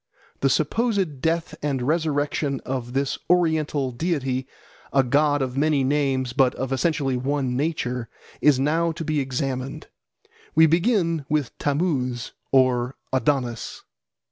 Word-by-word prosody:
The 135 Hz, -, +2 dB
supposed 175 Hz, -, 0 dB
death 165 Hz, +1 st, 0 dB
and 140 Hz, -4 st, -1 dB
resurrection 145 Hz, -2 st, 0 dB
of 125 Hz, -2 st, -4 dB
this 135 Hz, 0 st, -1 dB
oriental 155 Hz, -6 st, +2 dB
deity, 135 Hz, -3 st, -1 dB, 0.4 s
a 135 Hz, -1 st, +4 dB
god 145 Hz, +2 st, +2 dB
of 130 Hz, -1 st, -4 dB
many 145 Hz, -1 st, +2 dB
names 135 Hz, -2 st, 0 dB
but 130 Hz, -1 st, +3 dB
of 130 Hz, 0 st, -3 dB
essentially 140 Hz, -1 st, 0 dB
one 130 Hz, 0 st, -1 dB
nature, 125 Hz, -5 st, -2 dB, 0.3 s
is 145 Hz, -3 st, +5 dB
now 165 Hz, +4 st, +2 dB
to 165 Hz, +1 st, -5 dB
be 155 Hz, -1 st, 0 dB
examined. 135 Hz, -1 st, -3 dB, 0.7 s
We 160 Hz, +1 st, +7 dB
begin 165 Hz, -, +2 dB
with 150 Hz, -5 st, 0 dB
Tammuz 140 Hz, -5 st, -1 dB, 0.2 s
or 130 Hz, -1 st, +3 dB, 0.2 s
Adonis. 130 Hz, -4 st, -1 dB
140 Hz, 125 wpm, -24 LUFS, 130-155 Hz, 0.7 s, We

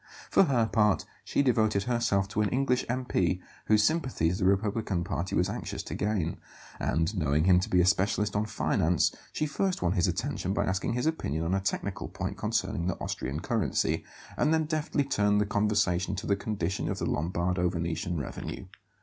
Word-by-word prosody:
For 195 Hz, -, +6 dB
her 125 Hz, -7 st, +2 dB
part, 105 Hz, -3 st, +2 dB, 0.2 s
she 140 Hz, -, +1 dB
devoted 110 Hz, -6 st, +2 dB
herself 110 Hz, -5 st, +1 dB
to 105 Hz, +1 st, 0 dB
an 105 Hz, -, +1 dB
English 125 Hz, -1 st, +1 dB
M.P. 105 Hz, -8 st, 0 dB, 0.3 s
whose 105 Hz, -1 st, +4 dB
sympathies 120 Hz, -, +1 dB
the -, -, +1 dB
republican 100 Hz, -1 st, +1 dB
party 95 Hz, -1 st, -3 dB
was -, -, +2 dB
anxious -, -, -4 dB
to -, -, -6 dB
gain; 100 Hz, -6 st, -1 dB, 0.4 s
and, 80 Hz, +6 st, 0 dB
knowing 75 Hz, -3 st, +1 dB
him 90 Hz, 0 st, +5 dB
to 90 Hz, -, -3 dB
be 90 Hz, -, +3 dB
a -, -, +3 dB
specialist 100 Hz, +2 st, +1 dB
on 105 Hz, +1 st, +1 dB
finance, 85 Hz, -5 st, +1 dB, 0.2 s
she 155 Hz, -, -1 dB
first 180 Hz, -, -1 dB
won 85 Hz, -, +2 dB
his 90 Hz, -3 st, +2 dB
attention 95 Hz, +2 st, -2 dB
by 100 Hz, -, +1 dB
asking 95 Hz, +2 st, -1 dB
his 125 Hz, +4 st, -1 dB
opinion 80 Hz, -, -1 dB
on 85 Hz, -, 0 dB
a 95 Hz, -, +2 dB
technical 95 Hz, -, -3 dB
point -, -, -4 dB
concerning 85 Hz, +1 st, -1 dB
the 90 Hz, -, -1 dB
Austrian 70 Hz, +4 st, -3 dB
currency, 100 Hz, -, 0 dB, 0.3 s
and 150 Hz, -, +2 dB
then 160 Hz, -1 st, +2 dB
deftly 150 Hz, -2 st, 0 dB
turned 105 Hz, -6 st, +2 dB
the 105 Hz, -, +2 dB
conversation 105 Hz, -3 st, +1 dB
to -, -, -5 dB
the 100 Hz, -, +2 dB
condition 100 Hz, -3 st, -2 dB
of -, -, -2 dB
the -, -, -2 dB
Lombardo 90 Hz, +2 st, 0 dB
Venetian 85 Hz, 0 st, -2 dB
revenue. 70 Hz, -, -6 dB
100 Hz, 185 wpm, -29 LUFS, 90-115 Hz, 0.4 s, For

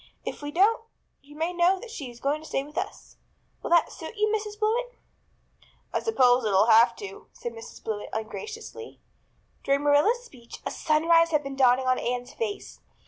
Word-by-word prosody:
If -, -, -5 dB
we 290 Hz, -, -4 dB
don't 405 Hz, +9 st, +3 dB, 0.4 s
you 290 Hz, +1 st, -16 dB
may 325 Hz, +3 st, -1 dB
know 355 Hz, +2 st, +3 dB
that 460 Hz, +3 st, -10 dB
she 285 Hz, -, -6 dB
is 240 Hz, 0 st, -13 dB
going 290 Hz, +4 st, -1 dB
to 315 Hz, -, -11 dB
stay 270 Hz, -, -1 dB
with 300 Hz, +2 st, -14 dB
us. 385 Hz, +3 st, -5 dB, 0.4 s
Will -, -, -5 dB
that 340 Hz, 0 st, +4 dB
suit -, -, -9 dB
you, 425 Hz, +1 st, +2 dB
Mrs. 420 Hz, -1 st, -5 dB
Blewett?" 485 Hz, +3 st, 0 dB, 1.0 s
"I -, -, +1 dB
suppose 255 Hz, -, +3 dB
it'll 200 Hz, -1 st, +4 dB
have 225 Hz, +2 st, +6 dB
to," 195 Hz, -1 st, -9 dB
said 240 Hz, -, -6 dB
Mrs. 225 Hz, 0 st, -11 dB
Blewett 210 Hz, -2 st, -4 dB
ungraciously. 450 Hz, -, -7 dB, 0.6 s
During 275 Hz, +1 st, +2 dB
Marilla's 355 Hz, +13 st, +3 dB
speech 240 Hz, -, -12 dB
a -, -, -2 dB
sunrise 330 Hz, +1 st, +3 dB
had 300 Hz, -2 st, +1 dB
been 275 Hz, 0 st, -6 dB
dawning 260 Hz, -1 st, +4 dB
on 255 Hz, 0 st, +2 dB
Anne's 245 Hz, 0 st, -3 dB
face. 435 Hz, -4 st, -5 dB
300 Hz, 185 wpm, -26 LUFS, 250-420 Hz, 1.0 s, have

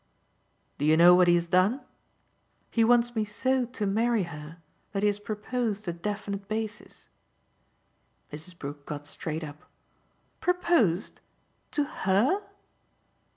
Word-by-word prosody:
"Do 145 Hz, -, 0 dB
you 155 Hz, +1 st, +5 dB
know 175 Hz, +2 st, +8 dB
what 180 Hz, 0 st, +5 dB
he 175 Hz, -, +6 dB
has 170 Hz, 0 st, +1 dB
done? 185 Hz, +9 st, +2 dB, 0.9 s
He 230 Hz, -, +3 dB
wants 240 Hz, +1 st, +3 dB
me 220 Hz, -, +1 dB
so 255 Hz, +4 st, 0 dB
to 235 Hz, -4 st, -4 dB
marry 225 Hz, +2 st, +1 dB
her 150 Hz, -1 st, -9 dB, 0.4 s
that 200 Hz, 0 st, -1 dB
he -, -, +5 dB
has 205 Hz, 0 st, 0 dB
proposed 215 Hz, 0 st, -3 dB
a 175 Hz, -, -1 dB
definite 200 Hz, +2 st, -4 dB
basis." 215 Hz, 0 st, -5 dB, 1.3 s
Mrs. 160 Hz, +4 st, -9 dB
Brook 145 Hz, -1 st, -8 dB
got 145 Hz, -1 st, -6 dB
straight 155 Hz, +2 st, -5 dB
up. 150 Hz, 0 st, -9 dB, 0.8 s
"'Proposed'? 335 Hz, -, +1 dB, 0.5 s
To 295 Hz, -, +2 dB
HER?" 250 Hz, -, +1 dB
205 Hz, 130 wpm, -28 LUFS, 170-230 Hz, 1.3 s, know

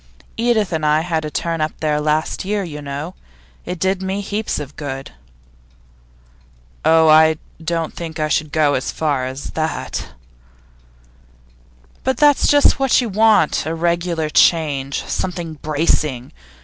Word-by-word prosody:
Edith 225 Hz, -5 st, +1 dB
and 160 Hz, -1 st, -1 dB
I 150 Hz, +1 st, +3 dB
had 160 Hz, -2 st, -2 dB
a -, -, -3 dB
turn 165 Hz, +1 st, -2 dB
up 155 Hz, -, -1 dB
there 150 Hz, -1 st, 0 dB
last 155 Hz, +1 st, 0 dB
year, 205 Hz, +1 st, -1 dB
you 150 Hz, -4 st, -7 dB
know; 145 Hz, +5 st, -5 dB, 0.5 s
it 180 Hz, -, -4 dB
did 190 Hz, +2 st, 0 dB
me 190 Hz, +1 st, -2 dB
heaps 210 Hz, +2 st, -3 dB
of 145 Hz, -1 st, -8 dB
good.' 135 Hz, -2 st, -6 dB, 1.7 s
'Oh, 160 Hz, 0 st, +5 dB
I 155 Hz, 0 st, +6 dB, 0.3 s
don't 165 Hz, -1 st, -2 dB
think 165 Hz, -1 st, -7 dB
I 155 Hz, -, +1 dB
should 150 Hz, 0 st, -1 dB
go 150 Hz, -2 st, +2 dB
so -, -, -5 dB
far 140 Hz, -5 st, 0 dB
as 130 Hz, +2 st, -6 dB
that.' 160 Hz, -1 st, -3 dB, 2.0 s
'But 260 Hz, -1 st, 0 dB
that's 290 Hz, 0 st, +4 dB
just 290 Hz, -1 st, +4 dB
what 270 Hz, -2 st, +3 dB
you 245 Hz, -3 st, -1 dB
want 210 Hz, -7 st, +3 dB
a 160 Hz, -, -2 dB
regular 170 Hz, -1 st, -1 dB
change, 145 Hz, -6 st, +2 dB
something 170 Hz, -4 st, -4 dB
bracing. 150 Hz, -4 st, 0 dB
160 Hz, 145 wpm, -19 LUFS, 150-185 Hz, 2.0 s, I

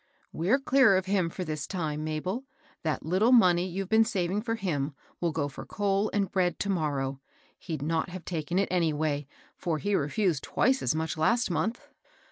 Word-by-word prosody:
*< -, -, -39 dB
We're 185 Hz, +11 st, +2 dB
clear 265 Hz, -7 st, +5 dB
of 185 Hz, -, -1 dB
him 190 Hz, -3 st, +1 dB
for 185 Hz, -, -5 dB
this 155 Hz, -3 st, -4 dB
time, 155 Hz, -5 st, -3 dB
Mabel 170 Hz, -, -3 dB
I 270 Hz, 0 st, -40 dB, 0.2 s
That 155 Hz, -2 st, -2 dB
little 190 Hz, +9 st, +3 dB
money 180 Hz, -7 st, +5 dB
you've 190 Hz, +1 st, -4 dB
been 220 Hz, +2 st, +5 dB
saving 195 Hz, -2 st, -1 dB
for 225 Hz, 0 st, -2 dB
him 150 Hz, -9 st, -2 dB, 0.2 s
will 170 Hz, -1 st, 0 dB
go 150 Hz, -2 st, -1 dB
for 140 Hz, -, -8 dB
coal 200 Hz, 0 st, 0 dB
and 200 Hz, -2 st, 0 dB
bread 180 Hz, -2 st, +1 dB
to 200 Hz, -, -2 dB
morrow. 140 Hz, -6 st, -1 dB, 0.4 s
He'd 155 Hz, -5 st, -5 dB
not 160 Hz, +3 st, 0 dB
have 180 Hz, -1 st, -8 dB
taken 170 Hz, 0 st, -2 dB
it 200 Hz, -, +2 dB
anyhow; 155 Hz, -4 st, 0 dB, 0.3 s
for 165 Hz, -3 st, -2 dB
he 205 Hz, +6 st, -1 dB
refosed 165 Hz, -1 st, +1 dB
twice 260 Hz, +1 st, +1 dB
as -, -, +1 dB
much 160 Hz, 0 st, -2 dB
last 230 Hz, +7 st, +2 dB
month." 185 Hz, +9 st, -2 dB
180 Hz, 195 wpm, -28 LUFS, 155-200 Hz, 0.4 s, clear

